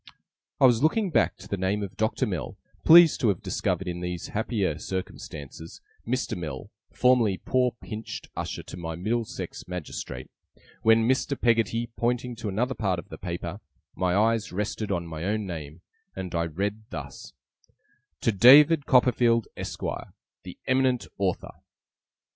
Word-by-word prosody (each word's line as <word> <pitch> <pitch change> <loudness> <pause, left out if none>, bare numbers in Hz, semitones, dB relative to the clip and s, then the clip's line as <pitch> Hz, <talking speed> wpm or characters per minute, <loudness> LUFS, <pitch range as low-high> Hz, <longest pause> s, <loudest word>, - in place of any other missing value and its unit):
I - - +6
was 120 -2 +5
looking 185 +6 +2
back - - +2
to - - -12
the 100 - -2
name 95 +3 0
of 100 -1 -7
Doctor 110 +3 0
Mell, 80 -10 -4 0.3
pleased 170 -1 +8
to 120 - +3
have 100 -4 0
discovered, 95 - -1
in 90 0 -3
these 90 -1 -4
happier 105 -7 -1
circumstances, 80 -4 -7 0.3
Mr. 130 +2 -1
Mell, 75 -7 -6 0.2
formerly 120 -6 +3
poor 125 +2 +1
pinched 110 0 -7
usher - - -4
to - - -9
my 80 -2 -5
Middlesex 110 +6 -3
magistrate, 90 -3 -6 0.5
when 115 0 +4
Mr. 130 +2 0
Peggotty 115 0 +1
pointing 120 +1 -1
to 110 -2 -4
another 120 +7 0
part 95 -7 -1
of 85 - -8
the - - -9
paper, 85 +2 -5 0.4
my 90 -1 +1
eyes 110 +1 +2
rested 105 +2 -3
on 85 -3 -1
my 80 -1 -6
own 105 +2 -1
name, 80 -3 -7 0.3
and 95 -2 -5
I 85 -1 0
read 100 +6 -3
thus: 70 -6 -8 0.9
'TO - - +2
DAVID 140 - +7
COPPERFIELD, 120 -2 +3
ESQUIRE, - - -5 0.3
'THE 90 - -10
EMINENT 130 -2 +2
AUTHOR. 95 -2 -1
105 Hz, 150 wpm, -26 LUFS, 90-120 Hz, 0.9 s, pleased